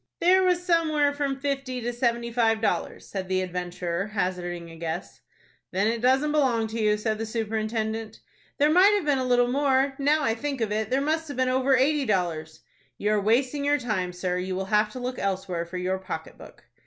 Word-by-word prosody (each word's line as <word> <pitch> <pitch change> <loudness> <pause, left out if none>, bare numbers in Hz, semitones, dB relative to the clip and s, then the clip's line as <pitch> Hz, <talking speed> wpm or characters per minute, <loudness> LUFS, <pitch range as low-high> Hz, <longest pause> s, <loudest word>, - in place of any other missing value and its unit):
"There 370 +2 +5
was 360 -1 +2
somewhere 310 -4 +2
from 280 -2 -2
fifty 275 -2 -2
to 240 0 -3
seventy 235 -1 0
five 225 -2 +2
dollars," 220 - -2
said 190 -2 -5
the 185 0 +1
adventurer, 180 0 -3
hazarding 180 -4 -3
a - - -11
guess. 165 +1 -5 0.5
"Then 190 +2 0
it 230 +1 0
doesn't 265 +4 +3
belong 260 -7 +2
to 225 +1 -3
you," 210 0 +3
said 215 0 -2
the 225 - -2
superintendent. 220 0 -3 0.4
"There 295 +2 +4
might 380 +5 +6
have 400 -6 -1
been 285 -3 +2
a - - 0
little 245 0 +3
more. 270 0 +2
Now 295 +2 +2
I 225 - +2
think 275 +3 -4
of 220 -3 -1
it, 215 0 -1
there 265 +2 +1
must 320 +2 -1
have 285 - -7
been 255 0 +2
over 260 +1 +3
eighty 285 +2 +2
dollars." 165 -6 -2 0.4
"You 210 - 0
are 210 -1 +2
wasting 255 +7 +1
your 290 +1 +3
time, 210 -9 -2
sir; 180 0 -2
you 185 0 -3
will 190 +1 -2
have 210 +1 +2
to 255 - -6
look 250 0 -4
elsewhere 185 -3 -2
for 180 +2 -6
your 185 +1 -1
pocket 170 -4 -6
book." - - -15
230 Hz, 210 wpm, -26 LUFS, 190-275 Hz, 0.5 s, might